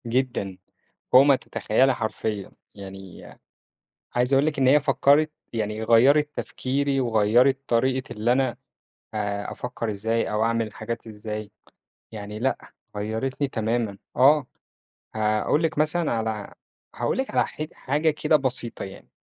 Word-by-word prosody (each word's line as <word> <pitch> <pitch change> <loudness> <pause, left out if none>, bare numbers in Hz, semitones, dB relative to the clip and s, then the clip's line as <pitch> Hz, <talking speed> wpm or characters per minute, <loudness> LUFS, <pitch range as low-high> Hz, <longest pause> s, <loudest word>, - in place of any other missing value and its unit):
جدًا، 115 -6 -1 0.6
فوق 130 - +9
ما 140 -1 +5
تتخيّلي 130 +1 +1
حرفيًا، 110 -3 -3 0.2
يعني 95 -2 -10 0.9
عايز 125 +2 +1
أقول 135 +2 +4
لِك 155 -2 -1
إن 130 - +3
هي 145 +3 +6
فكّرِت 150 +1 +3 0.2
يعني 110 -1 -2
غيّرِت 135 +7 +5
تفكيري 135 +1 -1
وغيّرِت 120 +3 +3
طريقة 130 +2 0
اللي 110 +2 0
أنا 130 -1 +1 0.6
آآ، 100 -1 -2
أفكّر 115 -2 -4
إزاي 110 +3 -1
أو 105 +1 +1
أعمل 115 0 +1
الحاجات 115 +2 -6
إزاي، 105 -1 -6 0.6
يعني 105 -1 -7
لأ، 135 +3 -2 0.2
غيّرِتني 110 +7 -2
تمامًا 115 -4 -2 0.2
آه، 135 +1 +5 0.7
هاقول 110 +7 +1
لِك 160 -2 -1
مثلًا 155 +2 +1
على 110 -2 -3 0.4
هاقول - - -1
لِك 265 - -1
على - - +2
ح - - -7
حاجة 150 +4 0
كده 155 +1 +2
بسيطة 130 -4 -2
يعني، 95 - -11
120 Hz, 135 wpm, -25 LUFS, 110-135 Hz, 0.9 s, فوق